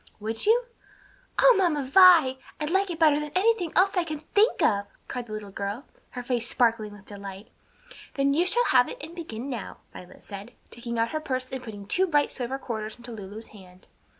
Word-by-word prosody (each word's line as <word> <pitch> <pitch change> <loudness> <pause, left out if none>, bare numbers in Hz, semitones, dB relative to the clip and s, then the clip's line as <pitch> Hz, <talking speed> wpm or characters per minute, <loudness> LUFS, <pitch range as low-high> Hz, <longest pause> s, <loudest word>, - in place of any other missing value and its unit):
Would 220 - -1
you?" 475 +3 +4 0.8
"O - - +7
Mamma 340 -7 +1
Vi! 310 -3 +6 0.2
I'd 300 +1 -2
like 390 +1 +2
it 340 - -4
better 305 -3 +4
than 300 0 -4
anything 380 -3 +2
else 390 +2 +4
I 360 - +2
can 310 -3 -6
think 425 +3 +3
of!" 200 -2 +2 0.2
cried 245 -1 -5
the - - -11
little 210 -2 -7
girl, 200 +7 -5 0.3
her 250 - -4
face 240 -1 -1
sparkling 225 -4 +1
with 205 -1 -15
delight. 200 0 -9 0.6
"Then 275 0 +2
you 340 +5 +2
shall 485 +5 +3
have 250 -1 +4
it - - -7
and 315 +3 -8
begin 275 -8 -7
now," 245 -7 -6 0.2
Violet 180 0 -13
said, 200 0 -9 0.2
taking 235 0 -6
out 230 0 0
her 310 - -2
purse 255 -4 -4
and 260 -1 -4
putting 205 -5 -9
two 370 - +2
bright 295 -4 +2
silver 260 +1 -4
quarters 220 -5 -5
into 240 0 -10
Lulu's 215 0 -8
hand. 185 -3 -16
255 Hz, 205 wpm, -26 LUFS, 215-325 Hz, 0.8 s, O